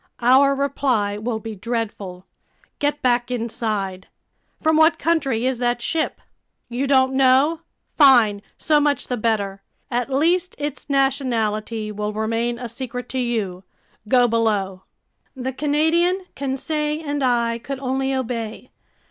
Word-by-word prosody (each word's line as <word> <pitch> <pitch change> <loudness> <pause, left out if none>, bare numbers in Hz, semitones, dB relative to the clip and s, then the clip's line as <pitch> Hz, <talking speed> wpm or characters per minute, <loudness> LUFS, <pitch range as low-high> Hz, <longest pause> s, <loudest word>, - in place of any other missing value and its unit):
Our 270 +3 +5
reply 255 -7 0
will 225 +1 -2
be 220 +1 -7
dreadful. 205 -4 -4 0.5
Get 290 0 -1
back 245 -1 +2
inside!" 215 -6 -3 0.5
"From 315 0 +2
what 315 +1 +5
country 275 -8 0
is 260 -2 0
that 240 0 0
ship?" 315 +6 -2 0.5
"You 250 +3 -2
don't 265 -1 +3
know? 270 +5 +4 0.3
Fine, 240 -8 +6 0.2
so 305 -2 +3
much 290 -1 0
the 250 - 0
better! 205 -3 -1 0.3
At 245 +1 -1
least 335 +7 +1
its 290 -2 -5
nationality 230 -6 0
will 210 0 -3
remain 230 +2 -1
a 245 0 -5
secret 245 +1 -6
to 260 - -2
you. 215 -7 -2 0.4
Go 245 +1 +4
below!" 205 -5 0 0.5
The 260 0 -4
Canadian, 320 +6 +1
Conseil, 300 +3 -2
and 290 0 -1
I 235 -2 +1
could 275 +3 -5
only 265 0 -1
obey. 240 -2 -4
250 Hz, 130 wpm, -22 LUFS, 225-280 Hz, 0.5 s, Fine